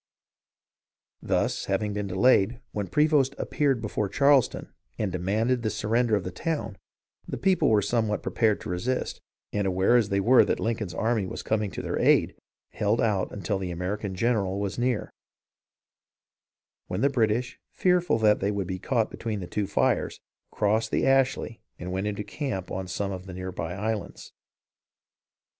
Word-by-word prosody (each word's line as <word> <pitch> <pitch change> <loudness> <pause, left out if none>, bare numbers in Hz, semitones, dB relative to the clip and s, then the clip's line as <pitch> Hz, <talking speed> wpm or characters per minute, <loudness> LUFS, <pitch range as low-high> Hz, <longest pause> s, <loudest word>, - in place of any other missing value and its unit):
Thus, - - 0
having 105 +2 -1
been 105 -1 -3
delayed, 100 +3 +3
when 105 -2 -3
Prevost 150 -3 +3
appeared 135 -6 0
before 105 -1 -2
Charleston 140 0 +2 0.2
and 105 -3 -1
demanded 110 +8 0
the 110 - 0
surrender 110 +2 +1
of 100 - -1
the 90 - -5
town, 145 - -3 0.5
the - - -4
people 190 -7 +2
were 105 -2 +4
somewhat 110 -2 0
prepared 110 -3 +1
to - - -7
resist, 105 +9 -2 0.3
and 100 -2 0
aware 95 +5 +3
as 115 -4 +3
they 100 -1 +1
were 120 +6 +6
that - - -1
Lincoln's 110 -7 -2
army 110 -2 0
was - - -6
coming 105 -2 0
to - - -6
their - - -2
aid, - - +3 0.4
held 105 +2 0
out 105 -4 +1
until 100 0 -2
the 95 -2 -4
American 95 +3 -3
general 100 -3 0
was 100 +2 -3
near, 120 -2 0 1.8
when 90 +3 -3
the 140 - +5
British, 120 0 0
fearful 180 -7 +2
that 105 -2 +4
they 100 - 0
would 100 -2 -1
be 95 +1 -4
caught 115 +1 0
between 110 -3 -4
the 90 - -5
two 100 +3 -2
fires, - - 0 0.3
crossed 110 +1 +1
the - - +1
Ashley 135 -4 +1 0.2
and 90 +1 -6
went 95 +2 -2
into 105 0 -3
camp 120 - -4
on 95 0 -4
some 100 +2 -3
of 95 0 -7
the 90 - -7
near 95 0 -5
by 90 -1 -4
islands. 105 +1 -4
105 Hz, 165 wpm, -27 LUFS, 95-120 Hz, 1.8 s, were